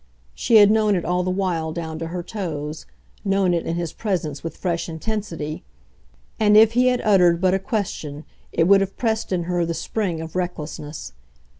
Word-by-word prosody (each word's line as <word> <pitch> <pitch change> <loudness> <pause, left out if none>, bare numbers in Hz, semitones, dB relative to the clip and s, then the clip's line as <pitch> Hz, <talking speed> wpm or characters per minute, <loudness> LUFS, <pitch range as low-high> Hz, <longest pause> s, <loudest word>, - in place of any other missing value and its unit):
She 230 - +1
had 205 -1 +8
known 215 -2 +3
it 175 - -2
all 180 0 +1
the 180 - -2
while 180 -4 -1
down 160 -1 -5
to 165 - -4
her 175 +1 -4
toes, 160 -7 -5 0.4
known 195 -3 +2
it 170 - -1
in 165 - -1
his 170 -2 -3
presence 175 -9 -3
with 165 - -6
fresh 170 -2 -2
intensity, 165 -3 -4 0.8
and 210 -1 +5
if 220 0 +7
he 250 +2 +3
had 250 -1 +2
uttered 180 -5 +4
but 185 0 +3
a 190 - +2
question 175 -8 -4 0.3
it 165 0 +2
would 195 0 +6
have 195 0 -3
pressed 220 -3 -1
in 180 -2 0
her 175 0 0
the 165 0 -2
spring 175 0 -2
of 160 +1 -7
recklessness. 160 -4 -5
180 Hz, 190 wpm, -22 LUFS, 165-205 Hz, 0.8 s, had